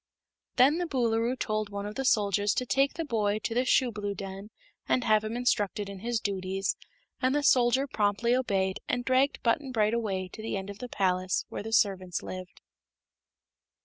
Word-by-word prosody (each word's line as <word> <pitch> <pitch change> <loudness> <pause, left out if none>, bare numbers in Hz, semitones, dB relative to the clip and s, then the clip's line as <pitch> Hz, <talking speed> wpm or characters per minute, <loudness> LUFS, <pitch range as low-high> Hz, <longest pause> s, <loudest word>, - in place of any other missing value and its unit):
Then 285 +7 +5
the 350 - -1
Boolooroo 240 -3 0
told 215 -3 -2
one 200 0 -5
of 210 - -5
the 270 - -3
soldiers 205 -3 +2
to 250 - 0
take 275 +2 +2
the 330 - -3
boy 215 -6 0
to - - -2
the 250 +2 +1
shoeblue 210 -7 +1
den 195 +1 -7 0.4
and 250 - +2
have 215 -2 +3
him 220 +2 -3
instructed 210 -4 0
in 200 -1 -8
his 235 +2 -1
duties, 195 -1 -2 0.5
and 260 +1 +2
the 295 - +1
soldier 255 0 +4
promptly 225 0 +1
obeyed 195 -7 0
and 245 -1 -1
dragged 260 +2 +2
Button 260 +3 +1
Bright 215 -2 +2
away 195 -5 -1
to 215 - -10
the 220 -2 -3
end 195 +1 -5
of 200 - -12
the 250 - -6
palace 185 -3 0
where - - -5
the 220 +2 -6
servants 190 -5 +1
lived. 185 0 -8
215 Hz, 185 wpm, -28 LUFS, 200-250 Hz, 0.5 s, Then